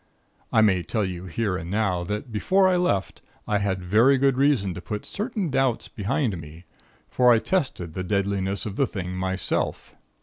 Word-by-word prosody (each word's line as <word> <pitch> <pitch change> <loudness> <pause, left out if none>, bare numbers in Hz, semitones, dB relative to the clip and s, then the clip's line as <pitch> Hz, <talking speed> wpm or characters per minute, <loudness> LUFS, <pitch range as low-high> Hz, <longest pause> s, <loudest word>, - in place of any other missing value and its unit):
I 110 - +4
may 95 -4 +3
tell 105 +5 -1
you 90 -1 -5
here 95 +2 -1
and 85 0 -7
now, 95 -3 0
that 105 +5 -4
before 190 - +3
I 185 - +3
left, 100 - 0 0.3
I 105 -1 +1
had 95 -2 -1
very 115 +9 +4
good 135 0 +3
reason 130 -9 +2
to 90 - -7
put 105 +3 -5
certain 210 - -3
doubts 130 -3 +1
behind 110 - -1
me; 80 +3 -12 0.4
for 125 -1 +4
I 115 - +6
tested 110 - -1
the 90 - -3
deadliness 100 0 -1
of 105 -2 -5
the 135 - +2
thing 90 -4 -5
myself. 95 -1 -2
105 Hz, 180 wpm, -25 LUFS, 95-130 Hz, 0.4 s, I